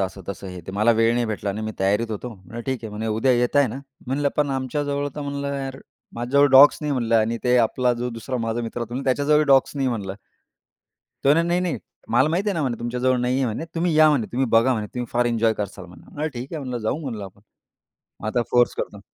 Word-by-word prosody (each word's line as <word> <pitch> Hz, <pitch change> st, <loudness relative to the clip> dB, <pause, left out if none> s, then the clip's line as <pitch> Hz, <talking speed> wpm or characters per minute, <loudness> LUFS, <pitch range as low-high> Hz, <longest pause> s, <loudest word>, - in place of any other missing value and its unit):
असं-तसं 95 Hz, 0 st, -5 dB
हे 90 Hz, -1 st, -8 dB
ते 95 Hz, -, -6 dB
मला 105 Hz, +4 st, +3 dB
वेळ 115 Hz, 0 st, +4 dB
नाही 120 Hz, 0 st, +1 dB
भेटला 105 Hz, -2 st, -3 dB
आणि 105 Hz, +3 st, -4 dB
मी 110 Hz, 0 st, -3 dB
तयारीत 105 Hz, +4 st, +1 dB
होतो." 110 Hz, +4 st, -4 dB
म्हणलं, 95 Hz, +4 st, -10 dB
"ठीक 130 Hz, -2 st, -1 dB
आहे." 110 Hz, -, -5 dB
म्हणे, 105 Hz, +2 st, -4 dB
"उद्या 110 Hz, +4 st, +2 dB
येताय 125 Hz, +3 st, +3 dB
ना." 125 Hz, +5 st, -6 dB, 0.3 s
म्हणलं, 140 Hz, +2 st, 0 dB
"पण 145 Hz, -1 st, +1 dB
आमच्या 135 Hz, +2 st, -2 dB
जवळ 145 Hz, 0 st, -1 dB
तर -, -, -4 dB
म्हणलं, 140 Hz, 0 st, -3 dB
यार 135 Hz, -1 st, -5 dB, 0.4 s
माझ्याजवळ 130 Hz, +5 st, +3 dB
डॉग्स 135 Hz, +2 st, +8 dB
नाही." 150 Hz, -2 st, -1 dB
म्हणलं, 120 Hz, -3 st, 0 dB
"आणि 115 Hz, +1 st, +1 dB
ते 125 Hz, 0 st, +4 dB
आपला 125 Hz, 0 st, +1 dB
जो 120 Hz, +1 st, -3 dB
दुसरा 115 Hz, +2 st, -5 dB
माझा 115 Hz, +1 st, -1 dB
मित्र 115 Hz, +1 st, -5 dB
होतो, 120 Hz, +3 st, -4 dB
त्याच्या 135 Hz, +1 st, +1 dB
जवळही 150 Hz, +1 st, +4 dB
डॉग्स 135 Hz, 0 st, +3 dB
नाही." 135 Hz, -2 st, +1 dB
म्हणलं. 100 Hz, -6 st, -3 dB, 1.1 s
तो -, -, +4 dB
म्हणे, 165 Hz, +3 st, +3 dB
"नाही, 175 Hz, +1 st, +2 dB
नाही. 180 Hz, -4 st, -1 dB, 0.3 s
मला 125 Hz, +6 st, +3 dB
माहिती 180 Hz, +6 st, 0 dB
आहे 200 Hz, -, 0 dB
ना 165 Hz, -, -1 dB
म्हणे 125 Hz, -4 st, -2 dB
तुमच्या 120 Hz, +1 st, -4 dB
जवळ 130 Hz, 0 st, +3 dB
नाहीये 130 Hz, +2 st, +1 dB
म्हणे, 120 Hz, +6 st, -3 dB
तुम्ही 170 Hz, 0 st, 0 dB
या 155 Hz, 0 st, +7 dB
म्हणे, 130 Hz, -7 st, +1 dB
तुम्ही 130 Hz, +2 st, +1 dB
बघा 115 Hz, +3 st, +4 dB
म्हणे 110 Hz, -4 st, -2 dB
तुम्ही 125 Hz, -1 st, -3 dB
फार 120 Hz, 0 st, +2 dB
एन्जॉय 115 Hz, -1 st, +2 dB
कराल 100 Hz, -3 st, -6 dB
म्हणे." 145 Hz, -, -6 dB
ठीक 130 Hz, 0 st, -8 dB
आहे 160 Hz, -, -3 dB
म्हणलं, 125 Hz, -2 st, -4 dB
"जाऊ 110 Hz, +5 st, -2 dB
म्हणलं 115 Hz, -9 st, -5 dB
आपण." 95 Hz, +1 st, -13 dB, 0.8 s
मग 110 Hz, -, -4 dB
आता 120 Hz, +3 st, +1 dB
फोर्स 120 Hz, 0 st, +4 dB
करतो. 100 Hz, -, -4 dB
125 Hz, 240 wpm, -23 LUFS, 110-140 Hz, 1.1 s, डॉग्स